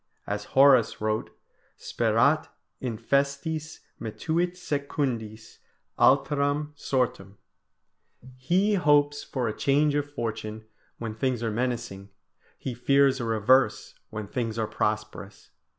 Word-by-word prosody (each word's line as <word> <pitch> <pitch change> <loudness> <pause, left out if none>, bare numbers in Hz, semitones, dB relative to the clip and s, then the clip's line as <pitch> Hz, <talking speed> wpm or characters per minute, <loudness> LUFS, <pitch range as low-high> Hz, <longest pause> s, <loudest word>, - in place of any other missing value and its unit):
As 105 0 -4
Horace 135 -4 +6
wrote: 110 0 -1 0.5
"Sperat - - +1 0.3
infestis, 140 +6 -2 0.2
metuit 165 +10 -2
secundis 130 -9 -3 0.4
Alteram 145 +2 +2
sortem." 120 -8 -2 1.0
"He 180 +11 +1
hopes 145 -4 +3
for 125 -3 -3
a 110 - -3
change 145 +2 +2
of 145 0 -1
fortune 110 -4 -5 0.3
when 115 -2 -5
things 120 +1 -1
are 115 - -1
menacing, 115 -4 -3 0.5
he 130 - -5
fears 135 +2 +3
a 120 - -3
reverse 115 +4 +2 0.2
when 110 -1 -5
things 115 -1 -3
are 110 - 0
prosperous." 105 -2 -4
130 Hz, 105 wpm, -26 LUFS, 110-145 Hz, 1.0 s, Horace